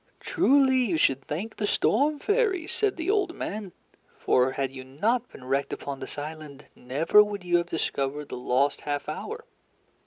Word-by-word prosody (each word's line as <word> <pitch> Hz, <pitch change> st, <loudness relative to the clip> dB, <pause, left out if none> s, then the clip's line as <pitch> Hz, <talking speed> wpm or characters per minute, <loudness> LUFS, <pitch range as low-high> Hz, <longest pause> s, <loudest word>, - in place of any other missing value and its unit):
"Truly, 265 Hz, -1 st, +3 dB
you 205 Hz, -10 st, +1 dB
should 135 Hz, -3 st, +2 dB
thank 200 Hz, +9 st, -4 dB
the 210 Hz, -, -1 dB
storm 285 Hz, +9 st, +2 dB
fairies," 400 Hz, -2 st, 0 dB
said 415 Hz, -4 st, 0 dB
the 335 Hz, +3 st, 0 dB
old 395 Hz, -5 st, 0 dB
man; 205 Hz, -3 st, -5 dB, 0.5 s
"for 130 Hz, +1 st, +2 dB
had 135 Hz, -1 st, -2 dB
you 130 Hz, -1 st, -8 dB
not 220 Hz, -, -1 dB
been -, -, -12 dB
wrecked 135 Hz, +2 st, -1 dB
upon 140 Hz, -1 st, -5 dB
this -, -, -8 dB
island, 150 Hz, -1 st, -7 dB
never 160 Hz, +11 st, +4 dB
would 205 Hz, -2 st, -5 dB
you 175 Hz, -1 st, +3 dB
have 170 Hz, 0 st, -2 dB
discovered 145 Hz, -2 st, -2 dB
the -, -, -5 dB
lost 130 Hz, +3 st, +1 dB
half 145 Hz, -1 st, -3 dB
hour. 445 Hz, -, -5 dB
170 Hz, 175 wpm, -27 LUFS, -, 0.5 s, never